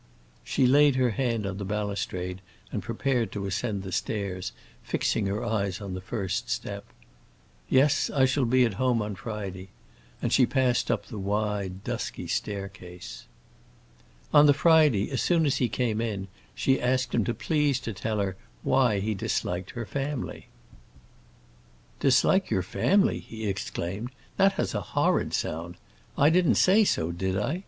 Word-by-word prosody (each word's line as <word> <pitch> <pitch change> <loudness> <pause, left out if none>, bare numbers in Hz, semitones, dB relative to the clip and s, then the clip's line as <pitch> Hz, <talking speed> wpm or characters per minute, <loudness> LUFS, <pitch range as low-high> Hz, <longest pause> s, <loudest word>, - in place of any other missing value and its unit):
She 130 - +1
laid 145 +2 +5
her 130 -2 +2
hand 115 -2 -1
on 95 0 -4
the - - -3
balustrade 95 -3 -3 0.3
and - - -2
prepared 125 -6 -1
to 100 -2 -3
ascend 100 +1 -2
the 95 - -6
stairs, 95 -1 -2 0.3
fixing 105 -3 0
her 105 +5 -2
eyes 100 -5 -1
on 100 -3 -6
the 95 - -5
first 95 -1 -3
step. - - -4 0.8
"Yes, 135 +2 +3
I 135 -2 +3
shall 135 0 +1
be 125 +1 +4
at 115 - -1
home 125 -2 +3
on 105 0 -4
Friday," 100 -3 -6 0.5
and - - -1
she 125 - +5
passed 130 -3 +1
up - - 0
the 110 -5 -7
wide 100 -1 -2
dusky - - -4
staircase. 95 -3 -5 1.1
On 145 0 +8
the 145 - +6
Friday, 155 - +4
as 130 - 0
soon 170 -3 +3
as 140 - +1
he 125 - +1
came 115 -1 -1
in, 100 -4 -3 0.3
she 135 -1 +1
asked 130 +1 0
him 115 - +2
to 120 - 0
please 150 -4 +1
to 115 - -4
tell 110 +3 -2
her 100 -2 -1 0.3
why 125 -6 +3
he 110 +2 -1
disliked 90 -2 -2
her 115 - -3
family. 140 +2 -4 1.5
"Dislike 140 +8 +3
your 95 - +1
family?" 200 - +2
he 110 -1 -8
exclaimed. 100 +2 -3 0.3
"That 195 0 +5
has - - -2
a - - -1 0.2
horrid - - +2
sound. 85 +2 -3 0.4
I 145 +3 +5
didn't 180 0 +4
say 205 +3 +5
so, 80 - 0
did 95 +2 -2
I? 140 - -1
110 Hz, 160 wpm, -27 LUFS, 95-130 Hz, 1.5 s, On